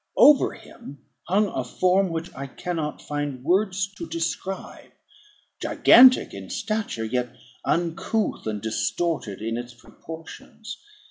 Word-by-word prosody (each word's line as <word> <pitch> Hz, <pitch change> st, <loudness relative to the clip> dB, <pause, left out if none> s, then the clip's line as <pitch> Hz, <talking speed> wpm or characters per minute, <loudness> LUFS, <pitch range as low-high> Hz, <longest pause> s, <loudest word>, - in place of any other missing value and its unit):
Over 295 Hz, -2 st, +6 dB
him 140 Hz, -, -12 dB, 0.3 s
hung 200 Hz, +4 st, +3 dB
a 130 Hz, -, -3 dB
form 185 Hz, +9 st, +2 dB
which 165 Hz, +1 st, -5 dB
I 140 Hz, 0 st, -6 dB
cannot 160 Hz, +1 st, -4 dB
find 145 Hz, -3 st, -4 dB
words 190 Hz, +3 st, +1 dB
to 335 Hz, -, -6 dB
describe; 195 Hz, -, -5 dB, 0.7 s
gigantic 255 Hz, 0 st, +6 dB
in 95 Hz, -2 st, -8 dB
stature, 215 Hz, -, -3 dB
yet 125 Hz, +1 st, -2 dB, 0.3 s
uncouth 175 Hz, -, -1 dB
and 105 Hz, -1 st, -2 dB
distorted 110 Hz, -, -2 dB
in 115 Hz, +1 st, -2 dB
its 120 Hz, 0 st, -7 dB
proportions. 165 Hz, -, -11 dB
165 Hz, 120 wpm, -24 LUFS, 125-195 Hz, 0.7 s, Over